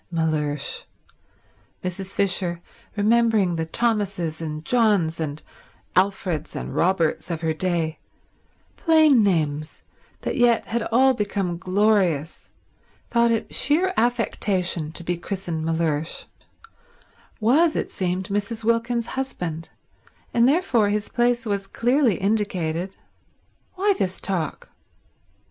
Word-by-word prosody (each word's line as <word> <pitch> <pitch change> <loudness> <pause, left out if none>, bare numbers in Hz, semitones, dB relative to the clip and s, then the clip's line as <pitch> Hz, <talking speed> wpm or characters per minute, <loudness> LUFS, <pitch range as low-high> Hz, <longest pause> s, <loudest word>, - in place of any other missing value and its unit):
Mellersh—Mrs. 160 +4 -5
Fisher, 180 -3 +1 0.4
remembering 215 -4 +3
the 160 -1 -2
Thomases 185 -6 -1
and 155 -1 -5
Johns 205 -10 +2
and 150 -2 -4 0.5
Alfreds 185 -4 0
and - - -5
Roberts 175 -2 +1
of 165 -2 -3
her 160 -1 0
day, 165 -1 -1 0.8
plain 315 -6 +5
names 155 -5 -1 0.4
that - - -3
yet 240 -2 +3
had 235 +1 -2
all 260 +3 +5
become 200 -6 -2
glorious, 185 -6 +1 0.6
thought 235 0 +4
it 225 -1 -1
sheer 340 +7 +2
affection 195 -8 0
to 170 - -7
be 175 +1 -2
christened 175 -3 -4
Mellersh—was, 230 - -2
it - - -2
seemed, 185 +1 -2
Mrs. 205 +3 -2
Wilkins's 230 +1 0
husband, 175 -12 -4 0.6
and 235 +1 +4
therefore 265 - +2
his 210 0 -1
place 240 +1 +1
was 200 -2 -2
clearly 245 +1 +2
indicated. 190 -3 -1 0.8
Why 400 +2 +2
this 190 - -2
talk? 175 -6 -3
195 Hz, 105 wpm, -23 LUFS, 165-235 Hz, 0.8 s, plain